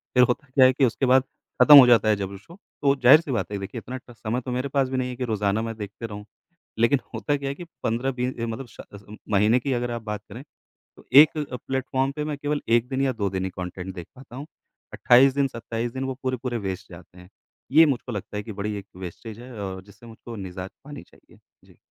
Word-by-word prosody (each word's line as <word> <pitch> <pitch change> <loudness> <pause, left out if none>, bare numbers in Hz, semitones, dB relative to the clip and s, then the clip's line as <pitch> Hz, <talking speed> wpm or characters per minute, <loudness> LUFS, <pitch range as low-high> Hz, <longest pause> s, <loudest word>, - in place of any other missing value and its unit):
फिर 125 - +7
होता 125 +3 0
क्या 130 -2 +7
है 130 - +5
कि 135 0 +3
उसके 125 +3 0
बाद 130 +1 +5 0.4
खत्म 150 -1 +10
हो 130 -3 +10
जाता 115 -3 +5
है 105 - +4
जब 100 -1 -4
वो 100 - -8
शो, 165 - -16 0.3
तो 140 -1 +3
ज़ाहिर-सी 145 +3 +6
बात 115 -3 -2
है 100 - -2
कि - - -6
देखिए, 100 +4 -6
इतना 130 +3 -7
ट 120 - -13
समय 120 +3 -3
तो 125 - -6
मेरे 125 +3 -2
पास 135 -1 +1
भी 130 - -2
नहीं 125 0 -1
है 125 - -6
कि 125 - -4
रोज़ाना 105 -2 0
मैं 115 0 -4
देखते 105 +2 -7
रहूँ। 105 -1 -9 0.5
लेकिन 120 +4 +3
होता 145 -1 -1
क्या 140 -1 -4
है 140 - -3
कि 175 - -9 0.2
15 120 +4 0
बी 125 0 -2 0.2
ए - - -1
मतलब 115 +3 -5
श - - -14
अज़म 105 +1 -12 0.2
महीने 105 +5 +4
की 135 - -2
अगर 120 -1 -1
आप 120 -1 -5
बात 105 -1 -5
करें, 120 +6 -8 0.6
तो - - -17
एक 150 +3 +8
अ, 145 -4 -4
प्लेटफ़ॉर्म 135 0 -1
पे 150 - -3
मैं 150 -2 -4
केवल 145 +1 -2
1 120 +1 +3
दिन 135 0 -1
या 135 - +2
2 100 -3 -2
दिन 95 0 -3
ही - - -2
कॉन्टेंट 90 +1 -7
देख 85 -2 -8
पाता 130 -2 -13
हूँ, 140 +3 -7 0.5
28 130 +2 +5
दिन, 140 -1 +2
27 115 -1 -5
दिन 130 - -4
वो 130 - -3
पूरे-पूरे 130 -2 -2
वेस्ट 95 -3 -6
जाते 90 +1 -14
हैं। 90 - -15 0.4
ये 160 +3 +7
मुझको 130 -4 -2
लगता 105 -1 -6
है 105 - -4
कि 110 - -8
बड़ी 105 +1 -4
एक 100 0 -9
वेस्टेज 100 +5 -9
है, 125 +1 -11
और 95 -1 -6
जिससे 100 +4 -18
मुझको 115 +1 -10
निजात 95 -2 -7
पानी 145 -1 -9
चाहिए। - - -23 0.3
जी। - - -22
120 Hz, 255 wpm, -24 LUFS, 105-130 Hz, 0.6 s, खत्म